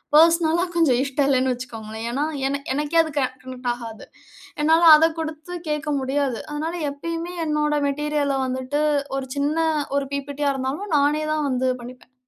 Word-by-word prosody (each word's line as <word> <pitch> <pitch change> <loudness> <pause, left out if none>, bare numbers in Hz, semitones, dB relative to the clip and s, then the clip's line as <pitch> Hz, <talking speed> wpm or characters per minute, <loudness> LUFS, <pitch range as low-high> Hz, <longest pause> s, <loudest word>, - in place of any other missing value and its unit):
பர்ஸ்னலா 330 +2 +5
கொஞ்சம் 285 -8 +3
இஷ்டம் 275 0 0
இல்லைன்னு 260 -1 +2
வச்சுக்கோங்களேன். 225 -3 -7
ஏன்னா, 280 +5 0 0.2
என 280 +1 -2
எனக்கே 300 +3 +1
அது 315 - -6
கனெக்ட் 255 -1 -4
ஆகாது, 230 -2 -9 0.6
என்னால 320 +2 +4
அத 320 +1 +5
குடுத்து 315 +2 -5 0.2
கேக்க 300 0 -2
முடியாது. 265 -2 -1
அதனால 315 +3 -3 0.2
எப்பயுமே 335 +4 -5
என்னோட 300 0 +1
மெட்டீரியல 290 -1 0
வந்துட்டு 260 +3 -2 0.3
ஒரு 265 -1 -4
சின்ன 290 +3 0 0.4
ஒரு 280 -1 -1
பிபிடியா 280 +1 -1
இருந்தாலும் 285 +9 -3
நானே 300 +2 +2
தான் 305 -1 0
வந்து 255 0 +1
பண்ணிப்பேன். 250 +1 -12
285 Hz, 145 wpm, -23 LUFS, 260-310 Hz, 0.6 s, பர்ஸ்னலா